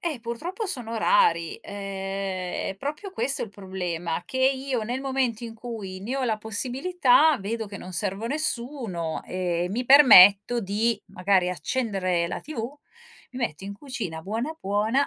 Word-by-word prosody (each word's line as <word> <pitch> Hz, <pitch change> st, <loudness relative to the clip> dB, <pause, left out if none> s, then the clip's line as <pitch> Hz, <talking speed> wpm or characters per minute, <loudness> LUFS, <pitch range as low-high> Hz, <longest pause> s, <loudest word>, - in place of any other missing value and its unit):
Eh, 310 Hz, -8 st, -3 dB
purtroppo 330 Hz, -, -4 dB
sono 245 Hz, -, -4 dB
rari! 440 Hz, -, +3 dB
Ehm, 195 Hz, -2 st, -4 dB
è -, -, -19 dB
proprio 305 Hz, -, -5 dB
questo 275 Hz, -7 st, -1 dB
il 225 Hz, -, -4 dB
problema, 180 Hz, -4 st, -4 dB
che 260 Hz, -, -7 dB
io, 265 Hz, -2 st, +1 dB
nel 245 Hz, +4 st, -3 dB
momento 260 Hz, -4 st, -1 dB
in 225 Hz, -1 st, -7 dB
cui 220 Hz, -5 st, -7 dB
ne 235 Hz, +7 st, -3 dB
ho 270 Hz, -, -1 dB
la 220 Hz, -3 st, +1 dB
possibilità, 265 Hz, -, +2 dB
vedo 220 Hz, +3 st, -3 dB
che 200 Hz, 0 st, -8 dB
non 185 Hz, -, -9 dB
servo 195 Hz, +3 st, -2 dB
a -, -, -2 dB
nessuno, 235 Hz, -, -3 dB
ehm, 180 Hz, -1 st, -2 dB
mi 245 Hz, +4 st, -1 dB
permetto 240 Hz, -5 st, +8 dB
di, 215 Hz, +3 st, 0 dB
magari, 185 Hz, -1 st, +1 dB
accendere 185 Hz, -, -1 dB
la -, -, -4 dB
tv, 275 Hz, -2 st, -6 dB, 0.5 s
mi 255 Hz, -, -8 dB
metto 195 Hz, -6 st, -3 dB
in 200 Hz, -, -5 dB
cucina 230 Hz, -, -5 dB
buona, 235 Hz, -, -3 dB
buona, 215 Hz, +8 st, +1 dB
225 Hz, 160 wpm, -25 LUFS, 190-265 Hz, 0.5 s, permetto